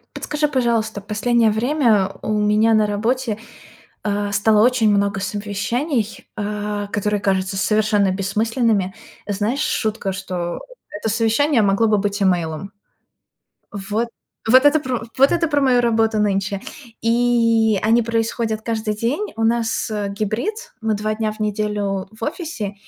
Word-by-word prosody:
Подскажи, 300 0 -1
пожалуйста, 230 -6 0
последнее 220 +2 +2
время 225 -4 +2
у - - -3
меня 210 +1 +3
на 215 -1 +3
работе, 225 +2 -1 0.7
э, 205 -1 -1
стало 210 +2 +3
очень 245 -3 +3
много 200 0 +2
совещаний, 210 - -2
э, 210 0 -3
которые 210 0 0
кажутся 190 -1 0
совершенно 205 0 +2
бессмысленными. 205 0 0 0.3
Знаешь, 210 +6 -1
шутка, 220 -8 -1
что 180 -3 -4 0.3
это 205 +2 -3
совещание 230 +5 +2
могло 200 +3 +3
бы 210 -1 +3
быть 200 0 -1
имейлом. 175 -1 0 1.0
Вот, 205 +4 -2 0.4
вот 260 +4 +6
это 290 +2 +5
пр 255 -5 -3 0.2
вот 275 +1 +6
это 340 -1 +2
про 290 -2 +1
мою 255 -3 +4
работу 225 -2 +2
нынче. 200 -1 0 0.4
И 230 -2 +3
они 225 +2 +4
происходят 225 -1 -1
каждый 220 -2 -2
день. 275 - -2
У 225 - -2
нас, 225 -1 0
э, 210 -1 -2
гибрид, 220 - -3
мы 220 -1 0
2 215 +1 -1
дня 215 0 -1
в 215 - -12
неделю 210 -2 -2
в 220 +1 -11
офисе 295 - -4
215 Hz, 140 wpm, -20 LUFS, 205-235 Hz, 1.0 s, вот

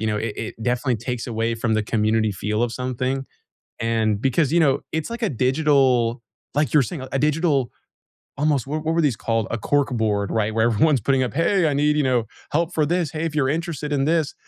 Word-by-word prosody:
You 110 - -1
know, 105 -1 0
it 110 -1 -3
it 110 0 -6
definitely 125 0 0
takes 120 +1 -4
away 115 0 -1
from 115 -1 0
the 110 - +1
community 110 0 +1
feel 105 +4 -2
of 120 -1 0
something, 130 +1 -2 0.5
and 110 -2 0
because, 135 +2 +1
you 170 - +4
know, 145 -3 +3
it's 160 +3 -2
like 235 +1 -6
a 220 - +2
digital, 130 -3 +2 0.3
like 150 +1 +1
you 150 - +6
were - - +3
saying, 130 -2 -6
a - - +1
digital 150 -4 +1 0.7
almost 145 -4 +1
what 155 +2 -3
what 160 +1 0
were 170 - +2
these 135 -7 +1
called? 115 0 -1
A 115 - -1
corkboard, 110 -6 0
right, 110 -1 0
where 110 0 +3
everyone's 135 +5 +3
putting 135 +4 +1
up, 125 - -2
"Hey, 170 +2 +2
I - - 0
need, 150 +1 +2
you 150 - +2
know, 125 -3 +2 0.3
help 170 +3 0
for 155 - +2
this. 170 -1 0
Hey, 155 +1 -3
if 160 -2 -3
you're 135 -3 +1
interested 155 -1 -3
in 135 -1 +1
this." 160 -2 +1
130 Hz, 225 wpm, -22 LUFS, 115-150 Hz, 0.7 s, you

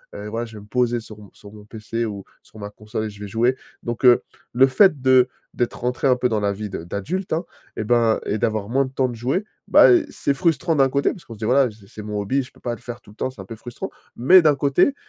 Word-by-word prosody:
heu, 105 +1 -7
voilà, 115 +2 -3
je 115 -1 -12
vais 105 - -10
me - - -17
poser 120 +1 0
sur 110 -1 -12
mon 105 -2 -14
sur 100 - -14
mon 105 -1 -13
PC 115 +2 -4
ou 100 -3 -6 0.2
sur - - -18
ma 105 - -6
console 105 +1 -5
et 110 - -4
je 100 - -13
vais 105 - -6
jouer», 120 +5 +1 0.3
donc, 120 +1 -3
heu, 125 -1 +7 0.3
le 130 +2 +6
fait 150 +1 +4
de 130 -1 +5 0.3
d'être 120 - -2
rentré 125 +3 0
un 130 - +5
peu 125 0 0
dans 110 -2 0
la 100 -1 0
vie 105 +1 -6
de 85 -4 -6
d'adulte, 155 - -4
hein, 165 +2 0 0.3
et - - -3
ben 115 0 +2
et 105 - -1
d'avoir 110 -1 -1
moins 135 +3 +2
de 130 - -9
temps 130 -1 0
de 120 - -6
jouer, 130 - -1 0.2
bah, - - +7
eh, 350 -4 +4
c'est 140 - -1
frustrant 165 +1 +1
d'un 135 -1 +5
côté, 140 +1 +1
parce 180 - -11
qu'on 115 - -10
se 110 - -13
dit: 110 - -3
«Voilà, 130 +2 +3
j'ai 105 -2 -16
c'est 105 - -10
mon 105 0 -4
hobby, 115 +8 0
je 130 - -15
peux - - -22
pas 120 - -2
le - - -16
faire 120 -1 -8
tout - - -19
le 105 - -20
temps, - - -2
c'est 115 - -11
un - - -10
peu 110 +3 -9
frustrant», 120 +2 -7 0.3
mais 180 +10 +6
d'un 155 -3 +4
côté, 140 - +2
120 Hz, 290 wpm, -22 LUFS, 105-135 Hz, 0.3 s, heu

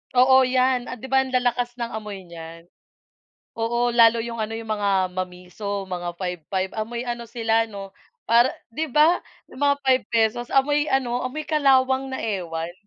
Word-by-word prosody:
Oo, 260 +1 +6
yan, 255 -1 +1
'di 265 - -8
ba, 265 0 +3
ang 260 - -8
lalakas 245 -1 0
ng 235 - -2
amoy 205 -4 -7
niyan. 165 0 -11 0.9
Oo, 235 +1 0
lalo 230 -1 +6
yung 230 -1 -5
ano, 220 +1 -3
yung 225 -1 -7
mga 195 -3 0
mamiso, 185 +2 -5
mga 175 -1 -5
5-5, 185 +1 -3
amoy 235 +3 -3
ano 240 -1 -4
sila 225 -1 +1
'no? 195 -2 -9 0.4
Para 235 +2 +5 0.2
'di 315 +6 -2
ba? 315 +4 +4 0.3
Yung - - -11
mga 285 0 +3
₱5 240 -2 +1
amoy 290 +2 +2
ano, 250 -2 0
amoy 300 +4 -4
kalawang 270 -3 +2
na - - -2
ewan. 175 -5 -3
235 Hz, 160 wpm, -23 LUFS, 195-260 Hz, 0.9 s, Oo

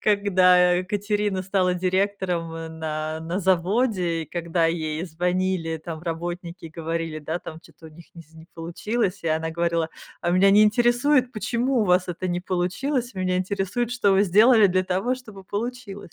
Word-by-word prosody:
когда, 185 -3 +4
э, 180 - 0
Катерина 205 -1 -1
стала 185 -1 +1
директором, 185 -2 -1
э, 165 0 -6
на 155 0 -4
на 170 +4 -3
заводе, 185 -1 +1
и 155 - -10
когда 170 -1 0
ей 160 -1 -2
звонили 180 -1 -1
там 160 0 -7
работники, 175 +1 -5
говорили, 165 -1 -4
да, 160 +3 -3
там, 160 -1 -9
чё-то 165 0 -16
у - - -10
них 165 +2 -15
ни 170 - -11
знь 160 0 -19
не 160 - -15
получилось, 185 +4 -2
и 165 - -1
она 160 +1 -1
говорила: 170 -1 -1 0.3
"А 175 - 0
меня 190 +2 +5
не 210 +2 +6
интересует, 245 +4 +3
почему 240 +2 0
у - - +1
вас 180 0 +2
это 180 +1 -4
не 175 0 -1
получилось, 210 +9 -2
меня 185 -1 -1
интересует, 200 +5 -2
что 225 -5 +2
вы 195 +2 +4
сделали 215 +3 +6
для 185 0 +1
того, 190 +8 0
чтобы 215 -7 -12
получилось". 205 -3 -6
180 Hz, 175 wpm, -24 LUFS, 165-205 Hz, 0.3 s, не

